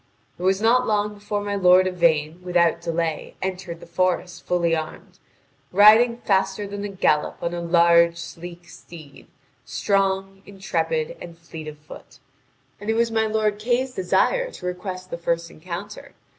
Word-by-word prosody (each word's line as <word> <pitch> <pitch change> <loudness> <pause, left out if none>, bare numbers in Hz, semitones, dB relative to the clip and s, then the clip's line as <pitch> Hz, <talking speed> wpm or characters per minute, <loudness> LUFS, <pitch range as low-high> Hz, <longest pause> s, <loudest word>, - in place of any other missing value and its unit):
It - - -9
was 190 +1 +2
not 240 +3 +3
long 210 -1 0
before 205 0 -4
my 205 0 -3
lord 185 -1 +5
Yvain 170 -2 +1
without 175 -2 +2
delay 165 -1 -3
entered 185 -2 -5
the - - -10
forest 180 +1 -1
fully 170 -2 +1
armed, 160 +4 -7 0.5
tiding 220 +5 +6
faster 195 +1 0
than 200 0 -6
a 205 - -3
gallop 180 -6 0
on 170 - -3
a 175 - -3
large, 170 0 +4
sleek 170 +1 -9
steed, 160 -3 -14 0.4
strong, 195 -1 -1
intrepid, 465 - -3
and 170 -1 -10
fleet 160 -2 -10
of 150 -1 -8
foot. 150 +1 -14 0.6
And 205 +2 -6
it 220 - +2
was 230 0 +1
my 220 0 +1
lord 215 -1 0
Kay's 250 +3 0
desire - - +1
to 180 - -10
request 185 0 -5
the 170 - -5
first 170 0 -2
encounter. 185 +5 -8
185 Hz, 155 wpm, -23 LUFS, 170-205 Hz, 0.6 s, tiding